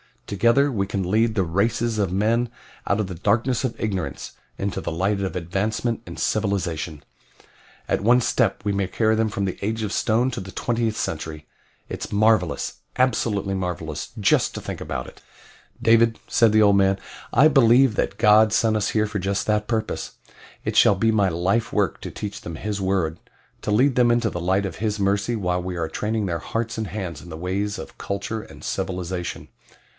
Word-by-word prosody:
Together 120 +8 +3
we 100 -5 -1
can 100 -1 -2
lead 110 +1 +2
the 95 - +2
races 110 +6 0
of 100 -4 +1
men 115 +5 +1 0.4
out 100 - +1
of - - -1
the 95 - -6
darkness 115 +9 +1
of 120 - -2
ignorance 95 -6 -3 0.3
into 100 -1 -2
the - - -3
light 100 +5 0
of 95 - -3
advancement 105 +7 -1
and - - -8
civilization. 90 -7 -1 0.8
At - - +1
one 120 +4 +5
step 115 -5 +1
we 105 - 0
may 100 -1 0
carry 110 +2 +1
them 110 0 +2
from 100 -1 -3
the 95 - -4
Age 110 +2 -1
of 105 - -2
Stone 120 +5 +1
to - - -4
the 95 0 -8
twentieth 115 -2 -1
century. 80 -3 -4 0.4
It's - - -5
marvelous 100 -7 +2 0.2
absolutely 110 -6 +1
marvelous 85 -5 -4
just 100 - +2
to - - -5
think - - -6
about 70 -5 -4
it." - - -14 0.6
"David," 115 0 +4
said 115 -2 +4
the 110 - +5
old 100 -1 +5
man, 95 0 +3 0.4
"I 150 - +7
believe 130 -2 +5
that 100 - -1
God 105 0 +5
sent 110 -1 +3
us 105 - 0
here 110 -1 +2
for 105 -1 -3
just 100 +1 -1
that 105 -1 +1
purpose 110 -2 -2 0.5
it - - -3
shall 100 - +6
be 110 +4 +2
my 105 -3 +3
life 95 +7 0
work 100 -4 +1
to - - -5
teach 105 -1 -6
them 85 - -7
His 105 +4 -3
word 95 -4 0 0.4
to - - -3
lead 125 +6 +3
them 125 -1 +4
into 120 -1 +2
the 85 - -4
light 95 +3 +1
of 95 - -5
His 105 0 -1
mercy 100 +4 +1
while 90 -4 -1
we 90 0 -4
are 80 -2 -2
training 110 0 -2
their 85 -3 -2
hearts 115 +6 -3
and 110 - -2
hands 90 -4 -5
in 90 - -12
the 80 - -7
ways 100 +4 -2
of - - -9
culture 100 +3 -3
and - - -13
civilization." 90 -1 -4
100 Hz, 195 wpm, -23 LUFS, 95-115 Hz, 0.8 s, I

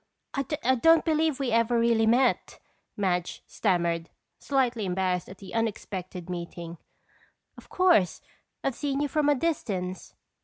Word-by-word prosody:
"I 275 - 0 0.4
don't 325 -1 +6
believe 315 -3 +1
we 270 -3 -1
ever 230 +1 +2
really 230 -1 +3
met," 245 +3 +2 0.4
Madge 180 -3 -1
stammered, 170 -4 0 0.3
slightly 250 -5 0
embarrassed 185 -1 -1
at 190 - -10
the 195 - -11
unexpected 190 -5 -3
meeting. 170 -1 -6 0.8
"Of - - -15
course, 355 - +3 0.4
I've 270 - 0
seen 280 +2 -2
you 290 - +1
from 295 0 +1
a 290 - +4
distance." 195 - -3
225 Hz, 130 wpm, -27 LUFS, 180-275 Hz, 0.8 s, don't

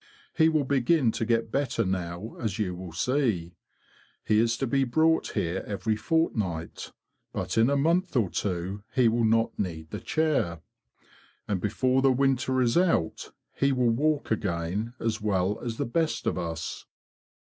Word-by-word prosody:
He 160 0 +5
will 155 -2 +2
begin 135 -1 +2
to 115 - -2
get 115 -1 +1
better 130 -5 0
now, 90 +2 -3
as 110 -3 -2
you 100 -5 -1
will 90 -1 -8
see. 100 - 0 0.7
He 105 - +3
is 115 0 +2
to 135 - -1
be 135 +2 +2
brought 160 +6 +2
here 85 +3 -1
every 110 +2 -1
fortnight; 105 - -1 0.4
but - - -3
in 115 +3 +4
a 140 - +2
month 170 +4 +1
or 110 -8 +2
two 95 +1 -3
he 125 -3 +5
will 115 +1 +2
not 115 +1 +1
need 80 -5 -4
the - - -4
chair. 150 - 0 0.9
And 100 -3 -1
before 130 +5 +1
the 135 0 +4
winter 130 0 +2
is 120 -1 +1
out 165 - 0 0.2
he 140 0 +1
will 125 -3 +2
walk 145 +4 0
again 100 +3 -2
as 110 -1 -2
well 100 -1 0
as 115 -2 -4
the - - -1
best 160 +6 -1
of - - +1
us." 85 -2 -5
115 Hz, 165 wpm, -27 LUFS, 95-135 Hz, 0.9 s, He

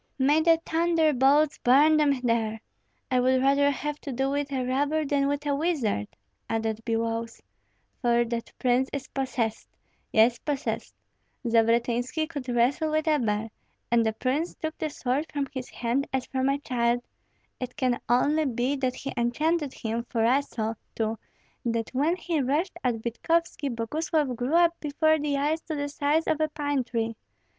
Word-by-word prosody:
"May 290 +3 +4
the 330 0 +4
thunderbolts 310 -3 +3
burn 290 +5 +5
them 285 -4 +2
there! 225 -2 0 0.5
I 255 - +3
would 260 +1 +3
rather 280 +2 +4
have 295 +1 -3
to 280 - -5
do 265 +2 0
with 285 0 -2
a 260 -2 -1
robber 290 +4 0
than 275 0 +1
with 285 +1 -2
a 290 - +1
wizard," 280 - 0 0.4
added 225 -1 -1
Biloüs; 230 0 -2 0.6
"for 240 -1 +3
that 230 0 -4
prince 255 +1 +2
is 275 -2 -4
possessed, 255 -5 -2 0.4
yes, 230 +2 +4
possessed. 290 -3 -3 0.5
Zavratynski 235 +5 +2
could 285 -6 -6
wrestle 245 +6 +2
with 310 +1 0
a 305 -1 +3
bear, 215 -1 -1 0.4
and 235 -1 +4
the 220 -1 0
prince 270 +9 -1
took 315 -1 -4
the 310 - -1
sword 280 +2 -2
from 285 -2 -2
his 260 -2 -5
hands 250 +4 -1
as 265 -1 -1
from 265 0 0
a 275 - +2
child. 245 -3 0 0.6
It 250 -1 -5
can 250 -2 +1
only 290 +6 +3
be 250 +1 0
that 255 -2 -1
he 275 - -5
enchanted 290 +5 0
him, 230 +1 -3
for 225 -2 +1
I 255 +4 +4
saw, 225 -6 -3 0.2
too, 220 -1 -1 0.4
that 230 -1 -2
when 295 +7 +2
he 340 -4 -1
rushed 295 +8 0
at 235 -3 -1
Vitkovski 305 +5 0
Boguslav 290 +4 -1
grew 250 +7 -1
up 340 0 +5
before 315 +1 +2
the 290 -1 0
eyes 300 +3 0
to 320 - -5
the 285 0 -2
size 290 +3 +1
of 315 - 0
a 310 - +2
pine 290 -3 -1
tree. 230 -2 -2
270 Hz, 170 wpm, -27 LUFS, 235-300 Hz, 0.6 s, burn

